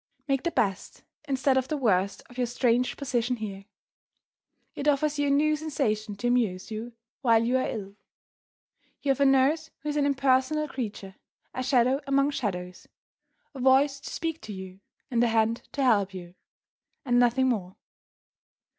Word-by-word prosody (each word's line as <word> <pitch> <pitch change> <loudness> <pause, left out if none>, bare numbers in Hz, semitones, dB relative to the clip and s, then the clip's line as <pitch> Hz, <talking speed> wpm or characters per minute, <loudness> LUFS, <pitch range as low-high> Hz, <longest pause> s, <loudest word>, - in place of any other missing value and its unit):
Make 270 -2 +1
the 340 - 0
best 200 - -2 0.2
instead 265 -1 +2
of 260 -1 0
the 305 - -2
worst 200 -7 +1
of 245 - -16
your 245 - +1
strange 245 0 +1
position 250 -3 -1
here. 200 -3 -7 1.1
It 285 - -4
offers 295 +1 +2
you 290 - +2
a - - +1
new 300 +2 +3
sensation 240 -9 -2
to 240 +5 -3
amuse 225 -6 0
you 225 +2 -6 0.3
while 230 -3 +4
you 245 +2 +1
are - - -1
ill. 200 -2 -6 1.1
You 285 - -1
have 270 - -1
a 280 - +4
nurse 270 +4 +3
who 300 - -4
is 295 - -2
an 285 -1 +2
impersonal 275 +2 +2
creature 210 -8 -6 0.4
a 255 - -3
shadow 255 +1 +2
among 275 +1 +2
shadows; 180 -9 -4 0.7
a 270 - -9
voice 270 +2 +4
to - - -8
speak 325 -1 -4
to 215 - -7
you, 190 0 -9 0.3
and 240 -1 +2
a - - +4
hand 225 0 0
to 280 - -1
help 200 -6 +2
you, 175 -1 -9 0.7
and 245 -2 +3
nothing 245 +2 +3
more. 190 -6 -2
250 Hz, 170 wpm, -27 LUFS, 215-275 Hz, 1.1 s, while